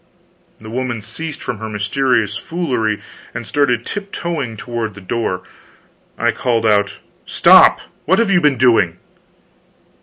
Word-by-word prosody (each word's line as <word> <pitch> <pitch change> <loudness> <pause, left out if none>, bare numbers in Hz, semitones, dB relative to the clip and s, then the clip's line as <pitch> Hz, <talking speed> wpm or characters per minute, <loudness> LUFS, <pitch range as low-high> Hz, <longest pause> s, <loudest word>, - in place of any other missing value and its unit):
The 110 0 -11
woman 125 -1 -2
ceased 150 +9 -7
from 120 -5 -4
her 110 0 -5
mysterious 110 +1 0
foolery, 125 -9 -2 0.3
and 115 - -5
started 125 -3 +1
tip 200 -1 -5
toeing 140 -10 -3
toward 115 -3 -4
the - - -10
door. 95 -1 -3 0.7
I - - +2
called 115 -3 0
out: 100 -2 +2 0.3
"Stop! - - +6 0.2
What 190 +5 +3
have 230 -3 +2
you 175 -2 +4
been 145 -4 +3
doing?" 115 -9 +3
120 Hz, 140 wpm, -18 LUFS, 110-145 Hz, 0.7 s, Stop